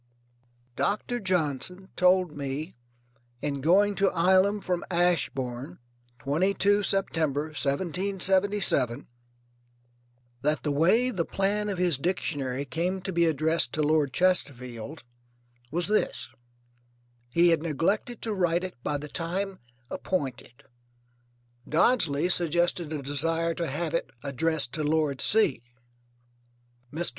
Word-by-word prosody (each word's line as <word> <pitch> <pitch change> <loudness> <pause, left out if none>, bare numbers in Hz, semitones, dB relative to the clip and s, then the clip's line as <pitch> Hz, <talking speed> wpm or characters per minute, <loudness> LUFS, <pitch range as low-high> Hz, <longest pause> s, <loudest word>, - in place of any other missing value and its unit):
Doctor 230 - -1
Johnson 180 - -2
told 180 -2 +3
me 145 +4 -4 0.7
in 140 -1 -3
going 195 +7 +4
to 195 0 +2
Ilam 190 +4 +3
from 180 -2 -2
Ashbourne, 135 - -1 0.4
22 195 +8 +2
September, 160 -7 0
1777, 180 - 0 1.3
that 150 +1 0
the 150 - 0
way 190 - +3
the 185 -7 -1
plan 205 +4 -1
of 195 - -3
his 175 -6 +1
Dictionary 140 -6 -2
came 175 +7 -2
to 190 0 -4
be 170 0 +3
addressed 160 +2 +2
to 155 - 0
Lord 150 -2 +2
Chesterfield 140 -7 -1 0.7
was 170 +5 -1
this: 135 - 0 1.0
He 170 +5 +4
had 165 -2 +3
neglected 170 - -1
to 225 - -2
write 175 -2 +1
it 185 -5 -6
by 145 +2 -1
the 150 +1 -7
time 185 +5 -3 0.3
appointed. 135 -8 -4 1.1
Dodsley 165 - +2
suggested 175 -1 +1
a 150 -3 -4
desire 165 +4 0
to 170 0 -3
have 155 +3 -3
it 170 - -1
addressed 145 -1 +1
to 155 - -2
Lord 150 -3 +1
C. 210 - +4 1.3
Mr. 170 +3 0
165 Hz, 115 wpm, -27 LUFS, 145-185 Hz, 1.3 s, going